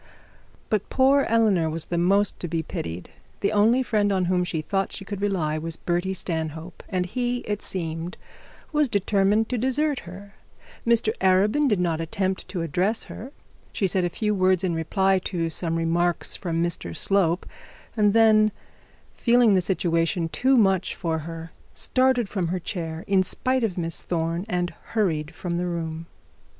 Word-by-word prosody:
But 210 -2 0
poor 275 +1 +4
Eleanor 210 -8 +3
was 160 0 -1
the 175 - -3
most 195 +3 +2
to 175 - -3
be 165 0 -2
pitied. 85 - -6 0.3
The 200 - +1
only 220 +5 +4
friend 210 -4 +1
on 190 -2 +1
whom 180 0 +1
she 170 -2 -2
thought 195 +4 -1
she 195 - -7
could 200 -1 -5
rely, 165 -7 0
was 165 +1 -4
Bertie 175 +2 -1
Stanhope, 160 -1 -4
and 180 -2 0
he, 245 +5 -2
it 210 -1 -3
seemed, 165 -1 -4 0.5
was 300 -3 +2
determined 205 +2 +2
to 250 - -1
desert 270 +3 +1
her. 200 +3 -11 0.5
Mr 230 -2 +3
Arabin 200 +10 +3
did 210 -7 +2
not 165 -2 0
attempt 190 +3 -2
to 175 -4 -3
address 185 +7 0
her. 255 +6 -9 0.4
She 200 - 0
said 185 0 +1
a 175 - +1
few 210 +4 -1
words 185 -2 +2
in 180 -2 0
reply 190 +4 +1
to 165 -3 -2
some 165 0 -1
remarks 170 +1 0
from 170 -3 -1
Mr 165 - -3
Slope, 185 -3 +2 0.5
and 210 -1 +3
then 215 -1 +5 0.6
feeling 240 -3 +4
the 185 - +4
situation 165 -2 0
too 260 +8 +2
much 195 -5 +2
for 165 -3 -2
her, 165 +1 -7 0.2
started 255 -3 +2
from 190 -4 -2
her 180 +2 -2
chair 165 -3 -4
in 195 -1 +3
spite 255 +6 0
of 200 -5 -1
Miss 165 -1 -2
Thorne, 170 +2 -2
and 175 -2 -1
hurried 165 -8 -1
from 170 0 -3
the 180 +1 -1
room. 165 -1 -4
185 Hz, 170 wpm, -25 LUFS, 165-210 Hz, 0.6 s, then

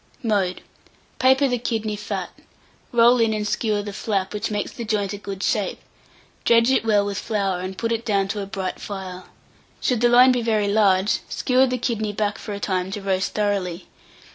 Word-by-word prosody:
Mode. 200 -5 0 0.6
Paper 265 +2 +4
the 245 -2 -1
kidney 220 -3 -2
fat; 205 - -4 0.6
roll 240 +1 +5
in 225 -1 +2
and 210 -1 -2
skewer 210 -1 0
the 205 0 -6
flap, 195 -2 -2
which 210 +2 -2
makes 210 -1 -2
the 235 - -6
joint 210 -2 -1
a - - -4
good 195 -1 -6
shape; 205 -5 0 0.6
dredge 230 +2 +4
it 265 - +2
well 210 -2 +3
with 200 -1 -3
flour, 195 -4 -1
and 185 +1 -6
put 230 0 -2
it 230 0 -1
down 200 -4 +1
to 205 +1 -2
a 195 - -5
bright 190 -3 -4
fire. 185 -2 -7 0.5
Should 245 -3 0
the 240 - +5
loin 250 +2 +7
be 250 -1 +1
very 215 -3 +1
large, 200 -1 +3
skewer 255 +1 +2
the 250 0 -1
kidney 220 -3 -2
back 210 0 -1
for 210 - -6
a - - -6
time 185 -2 -1
to 205 - -4
roast 190 0 -1
thoroughly. 195 -4 -1
210 Hz, 195 wpm, -23 LUFS, 195-230 Hz, 0.6 s, loin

